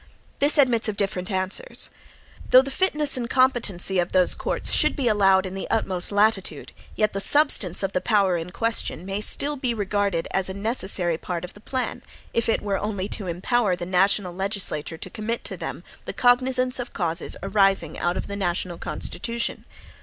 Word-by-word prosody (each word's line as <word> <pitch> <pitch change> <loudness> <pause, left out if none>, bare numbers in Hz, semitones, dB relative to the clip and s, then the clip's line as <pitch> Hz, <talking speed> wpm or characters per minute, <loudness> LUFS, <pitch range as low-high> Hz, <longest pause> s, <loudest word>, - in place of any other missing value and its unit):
This 290 +2 +4
admits 245 -5 +3
of 205 - -5
different 190 -2 -2
answers. 190 - 0 0.6
Though 255 +1 +7
the 275 - -6
fitness 300 -4 +3
and 240 -2 -4
competency 235 -9 +2
of 175 0 -2
those 185 -1 +5
courts - - -2
should - - +3
be 275 -5 -1
allowed 195 -3 +3
in 185 - -6
the 195 - -5
utmost 190 -5 -1
latitude, 205 -7 0 0.2
yet 215 -1 +1
the 195 - -2
substance 210 - +3
of 195 - -1
the 185 - -1
power 200 -5 +2
in 165 +1 -4
question 225 -3 -2
may 195 +2 -3
still 290 +6 +1
be 250 -3 -2
regarded 200 -4 -1
as 190 -1 0
a 190 - -5
necessary 195 -6 0
part 180 -1 -4
of 180 - -11
the - - -15
plan, 260 +3 -3 0.3
if 230 0 0
it 225 - +1
were 200 -2 -1
only 200 -2 -3
to 200 - -4
empower 190 +4 0
the 175 - -6
national 185 0 +1
legislature 190 -5 -2
to - - -7
commit 230 +2 -4
to - - -6
them - - -6 0.2
the - - -5
cognizance 255 +1 +3
of 245 - -6
causes 170 -3 -3
arising 195 -5 +2
out 175 +1 -1
of - - -4
the 200 - -5
national 175 -2 -2
Constitution. 235 0 -4
200 Hz, 185 wpm, -24 LUFS, 185-235 Hz, 0.6 s, Though